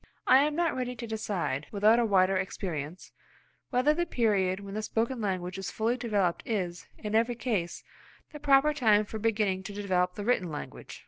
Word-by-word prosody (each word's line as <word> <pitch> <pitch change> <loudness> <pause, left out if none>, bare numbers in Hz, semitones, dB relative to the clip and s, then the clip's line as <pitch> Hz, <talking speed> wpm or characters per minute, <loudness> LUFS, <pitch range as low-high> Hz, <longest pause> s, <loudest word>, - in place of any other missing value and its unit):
I 260 - +7
am 295 +1 +1
not 340 -1 +1
ready 250 -1 -3
to 235 0 -6
decide, 180 - -3
without 215 +3 +4
a 235 - +3
wider 195 -2 +3
experience, 180 -4 -4 0.6
whether 260 +4 +3
the 345 +2 -1
period 195 -5 +1
when 200 0 -8
the 215 - -2
spoken 230 +3 -1
language 185 -2 -2
is 195 - -4
fully 225 +2 0
developed 205 -8 0
is, 180 -6 -3
in 210 0 -5
every 230 +2 +2
case, 205 -9 -2 0.5
the 300 - -9
proper 285 +1 +4
time 215 -7 +3
for 220 +1 -6
beginning 210 -4 0
to 200 +2 -8
develop 185 -3 0
the 205 - -5
written 215 -7 +1
language. 150 -2 -8
210 Hz, 185 wpm, -29 LUFS, 185-240 Hz, 0.6 s, I